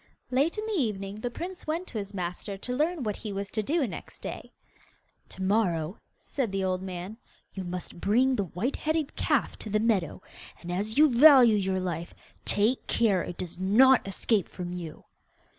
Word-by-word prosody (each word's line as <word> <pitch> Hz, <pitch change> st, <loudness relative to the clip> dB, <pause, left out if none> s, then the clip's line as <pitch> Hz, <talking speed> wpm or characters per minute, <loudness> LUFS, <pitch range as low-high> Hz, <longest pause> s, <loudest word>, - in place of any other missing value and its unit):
Late 280 Hz, -, +2 dB
in 425 Hz, -, -3 dB
the 440 Hz, -, -3 dB
evening 200 Hz, -3 st, -3 dB
the 245 Hz, -, -2 dB
prince 355 Hz, +9 st, -7 dB
went 330 Hz, +4 st, -1 dB
to 225 Hz, -, -4 dB
his 200 Hz, -1 st, -6 dB
master 185 Hz, +1 st, -4 dB
to 250 Hz, +5 st, -5 dB
learn 310 Hz, +2 st, 0 dB
what 210 Hz, -3 st, -2 dB
he 215 Hz, -, -6 dB
was 200 Hz, 0 st, -4 dB
to 215 Hz, -, 0 dB
do 295 Hz, +7 st, +1 dB
next 220 Hz, -, -8 dB
day. -, -, -7 dB, 0.8 s
'To 190 Hz, -, -7 dB
morrow,' 185 Hz, -4 st, +1 dB, 0.2 s
said 255 Hz, -7 st, -3 dB
the 195 Hz, 0 st, -1 dB
old 185 Hz, -1 st, 0 dB
man, 185 Hz, +3 st, -6 dB, 0.4 s
'you 190 Hz, -, -5 dB
must 175 Hz, -1 st, -6 dB
bring 255 Hz, +6 st, +3 dB
the 200 Hz, -, -1 dB
white 185 Hz, -, -3 dB
headed 315 Hz, -2 st, -1 dB
calf -, -, 0 dB
to 220 Hz, -, -7 dB
the 215 Hz, +1 st, +1 dB
meadow, 210 Hz, -8 st, +1 dB, 0.4 s
and, 175 Hz, -, -7 dB
as 205 Hz, +6 st, -2 dB
you 305 Hz, +1 st, +8 dB
value 255 Hz, -3 st, +7 dB
your 190 Hz, -2 st, 0 dB
life, 170 Hz, -2 st, -4 dB, 0.3 s
take 220 Hz, +5 st, +2 dB
care 205 Hz, -6 st, +2 dB
it 175 Hz, -, -6 dB
does 175 Hz, -1 st, -6 dB
not 240 Hz, +6 st, +5 dB
escape 195 Hz, 0 st, 0 dB
from 180 Hz, -1 st, -6 dB
you. 170 Hz, -3 st, -7 dB
205 Hz, 190 wpm, -28 LUFS, 185-255 Hz, 0.8 s, you